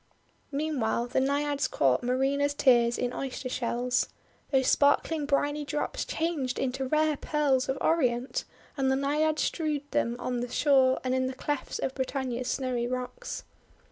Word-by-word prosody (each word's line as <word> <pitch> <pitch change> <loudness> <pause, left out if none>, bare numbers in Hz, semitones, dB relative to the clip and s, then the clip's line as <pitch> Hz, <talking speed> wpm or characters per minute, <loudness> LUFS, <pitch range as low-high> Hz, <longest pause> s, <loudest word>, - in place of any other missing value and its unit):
Meanwhile, 275 -5 -1
the 255 - +1
Naiads 280 0 +1
caught 130 -3 +2
Marina's 275 +3 +1
tears 240 -4 +4
in 250 0 -1
Oyster 265 -1 -4
shells. 245 0 0 0.4
Those 265 -2 +2
sparkling 285 +2 +3
briny 290 +1 +1
drops 295 +1 -2
changed 310 -6 -2
into 265 0 -1
rare 305 +1 +2
pearls 280 -4 +1
of 265 - 0
Orient, 255 -6 +1 0.3
and 270 -2 +1
the 265 - +3
Naiads 300 +3 +1
strewed 305 -3 -1
them 235 +1 +1
on 245 0 -2
the 245 0 -3
shore 265 -1 +4
and 255 0 0
in 260 0 +1
the 260 - -5
clefts 290 +1 -3
of 265 - -2
Britannia's 260 -2 -2
snowy 250 -3 -1
rocks. 255 - -5
265 Hz, 150 wpm, -28 LUFS, 250-290 Hz, 0.4 s, tears